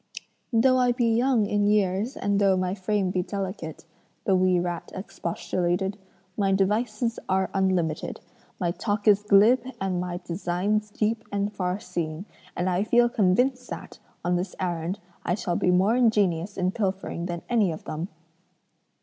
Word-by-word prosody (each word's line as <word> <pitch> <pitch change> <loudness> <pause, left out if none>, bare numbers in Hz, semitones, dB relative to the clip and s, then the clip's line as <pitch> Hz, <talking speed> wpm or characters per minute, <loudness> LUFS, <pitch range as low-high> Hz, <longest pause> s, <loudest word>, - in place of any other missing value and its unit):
'Though 255 +2 +4
I 250 -1 +3
be 240 0 +1
young 240 -2 +3
in 205 0 +1
years 205 +3 +1
and 200 0 +1
though 195 -2 +4
my 185 0 0
frame 195 -1 0
be 185 - 0
delicate,' 185 -4 -5 0.4
the 195 - +3
wee 185 -1 +3
rat 175 -1 -4
expostulated, 185 0 -2 0.4
'my 195 -2 +2
devices 215 +4 0
are 190 0 +1
unlimited, 185 -5 0 0.4
my 175 -2 +1
talk 205 +3 -2
is 205 -1 +6
glib 210 +5 +5 0.2
and 185 -2 -1
my 180 -1 -3
designs 195 +5 -1
deep 220 +2 -1
and 205 +1 -1
farseeing; 180 -3 -3 0.3
and 175 - 0
I 185 +1 +1
feel 240 +2 +4
convinced 245 +4 +1
that, - - -8 0.3
on 175 0 +2
this 180 +3 -4
errand, 175 0 -2 0.3
I 175 - 0
shall 175 -4 -2
be 180 - +1
more 190 +5 +4
ingenious 205 -6 +2
in 185 -1 +1
pilfering 190 -4 -2
than 170 -1 -5
any 220 -7 +2
of 155 - -7
them.' 160 +3 -4
195 Hz, 155 wpm, -26 LUFS, 180-210 Hz, 0.4 s, is